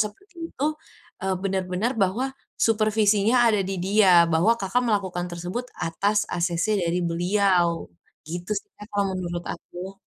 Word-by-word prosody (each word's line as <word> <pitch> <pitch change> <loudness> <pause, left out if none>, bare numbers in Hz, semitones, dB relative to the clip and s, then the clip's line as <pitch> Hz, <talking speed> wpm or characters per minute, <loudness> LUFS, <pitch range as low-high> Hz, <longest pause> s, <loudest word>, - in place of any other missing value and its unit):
seperti 330 - -4
itu, 295 +3 -1 0.5
eee, 190 -1 -1
benar-benar 190 +4 -1
bahwa 230 +8 0 0.2
supervisinya 215 +1 +3
ada 215 -3 +3
di 195 0 -2
dia, 185 -2 +5
bahwa 200 +9 +4
Kakak 205 +4 0
melakukan 190 -6 -1
tersebut, 180 +9 -5
atas 200 +6 0
asese 175 +4 0
dari 170 +1 0
beliau. 175 - +1 0.3
Gitu 175 +4 -6
sih, - - -5
Kak, 210 - -10
kalau 200 -1 0
menurut 175 -2 -4
aku. 190 +2 -8
195 Hz, 135 wpm, -24 LUFS, 175-215 Hz, 0.5 s, dia